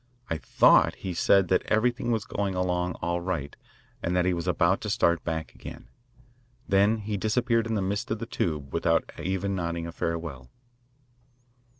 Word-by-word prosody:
I 80 - -1
thought - - +4
he 95 - -5
said 95 +2 +4
that 95 - +3
everything 120 +2 +1
was 110 -3 0
going 100 -2 -2
along 90 -1 -1
all 85 0 -1
right 85 -6 -3 0.5
and 90 - -1
that 90 0 +2
he 90 - +2
was 85 0 -4
about 90 +1 +2
to 105 - -4
start 85 -5 +2
back 80 -1 -4
again. - - -11 0.8
Then 100 +3 +3
he 105 -1 -3
disappeared 115 +2 +1
in 115 - -1
the 100 - 0
mist 100 +2 -2
of 110 - -1
the 115 - -5
tube 75 -10 -3
without - - +1
even 95 +2 -2
nodding 85 -2 -2
a 85 - -5
farewell. 80 -7 -4
90 Hz, 175 wpm, -27 LUFS, 85-105 Hz, 0.8 s, thought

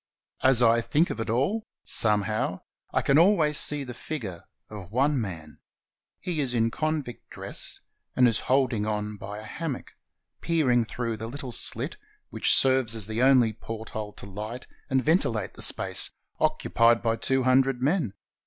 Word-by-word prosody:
As 130 -2 +4
I 115 0 +4
think 155 +8 +1
of - - -5
it 115 - -3
all, 140 - +1 0.2
somehow 105 -3 +1 0.3
I - - 0
can 140 +2 +4
always 165 -5 +4
see 150 -1 -1
the 125 -2 -7
figure 110 - -6 0.2
of 100 -4 -10
one 135 +3 +2
man. 80 -8 -7 0.6
He 175 -4 -3
is 130 -4 -1
in 115 0 +2
con 155 +1 -1
vict's 120 -2 -10
dress, - - -2 0.3
and 125 -1 +5
is 115 - +2
holding 125 -5 +2
on 105 0 -3
by 100 +1 -7
a 105 - -8
hammock, 145 +4 -5 0.5
peering 130 -8 +2
through 115 -1 -4
the 110 +1 -6
little 135 0 -7
sHt - - -1 0.3
which - - +4
serves 130 -4 +3
as 110 -3 -3
the 110 +3 -3
only 130 -4 +5
porthole 110 -1 -7
to - - -9
light 105 +5 -7 0.2
and 130 -1 +1
ventilate 120 - +1
the - - -10
space - - +3 0.3
occupied 115 0 +2
by 115 -1 +1
two 130 +3 0
hun 130 +1 +5
dred 135 -2 -2
men. 135 - 0
120 Hz, 170 wpm, -26 LUFS, 110-135 Hz, 0.6 s, and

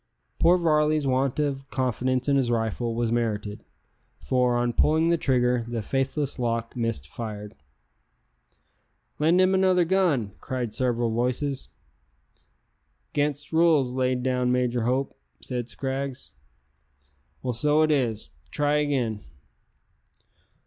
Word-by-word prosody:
Poor 175 +2 +5
Varley's 155 -3 +2
want 135 +1 0
of 135 -2 -2
confidence 130 0 -1
in 140 - +3
his 130 -3 +2
rifle 115 0 -1
was 115 -1 0
merited, 105 -3 -2 0.5
for, 125 -1 +1
on 120 0 0
pulling 160 +5 +3
the 170 - +4
trigger, 125 -4 +1
the 115 -2 -3
faithless 135 +4 -1
lock 115 -1 -2
missed 115 - -2
fire. 105 0 -7 1.7
"Lend 165 +4 +3
him 185 +1 +4
another 185 -2 +3
gun," 165 - +1
cried 125 -4 -3
several 120 0 0
voices. 125 +4 -1 1.4
"'Gainst 145 +1 -1
rules 160 -6 +4
laid 125 -1 0
down 125 -1 0
by 125 0 +2
Major 120 -2 -1
Hope," 130 +3 -1 0.2
said 125 -2 -5
Scraggs. 135 +1 -4 1.1
"Well, 125 -1 -1
so 150 +5 +3
it 155 - +2
is; 120 -7 -1 0.2
try 145 0 +1
again." 130 -8 -1
130 Hz, 120 wpm, -25 LUFS, 120-145 Hz, 1.7 s, Poor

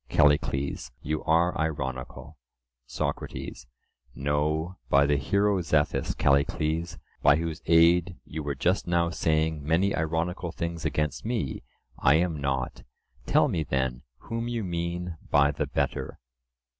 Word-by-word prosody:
CALLICLES: 70 0 +2
You 75 +1 -2
are 85 +2 +3
ironical. 65 -2 -4 0.5
SOCRATES: 65 0 -4 0.5
No, 75 +5 -1
by 70 +1 +5
the 75 0 +2
hero 100 +7 +1
Zethus, 75 -3 0
Callicles, 75 +4 +1 0.2
by 70 - +6
whose 80 0 -3
aid 85 +1 +5
you 80 - -5
were 70 -1 -3
just 90 +2 0
now 85 -1 +2
saying 80 -2 0
many 85 +6 +2
ironical 85 +2 -1
things 85 -1 -4
against 75 -2 -1
me, 110 - -2 0.4
I 70 - +5
am 80 -3 0
not:—tell 65 -3 -1
me, 80 - -1
then, 65 -4 -1 0.2
whom 115 0 -4
you 120 -2 -2
mean, 85 -1 -3
by 70 0 +4
the 70 - -2
better? - - -2
80 Hz, 125 wpm, -27 LUFS, 70-85 Hz, 0.5 s, by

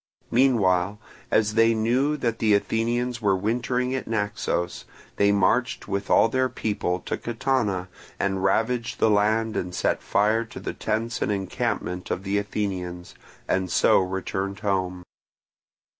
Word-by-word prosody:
Meanwhile, 105 -6 +3 0.3
as 105 -1 +2
they 115 +1 +4
knew 125 +7 +1
that 115 -4 -1
the 110 -2 +4
Athenians 120 +3 -1
were 100 -3 +3
wintering 125 +5 -1
at 130 - -3
Naxos, 100 -5 -2 0.3
they 100 0 +4
marched 100 +5 +1
with 100 0 -3
all - - +5
their 130 +2 +1
people 100 -6 -2
to - - -3
Catana, 115 -6 -1 0.3
and 95 -1 0
ravaged 115 +4 0
the 110 - +3
land 110 +2 +2
and 90 0 -3
set - - 0
fire 110 +3 +2
to 115 - -10
the - - -4
tents 115 +2 -2
and - - +1
encampment 90 -2 -2
of 95 - -2
the 100 +1 0
Athenians, 95 -4 -4 0.3
and 95 -2 0
so - - +5
returned 95 +1 -3
home. 95 -3 -1
105 Hz, 145 wpm, -25 LUFS, 95-115 Hz, 0.3 s, all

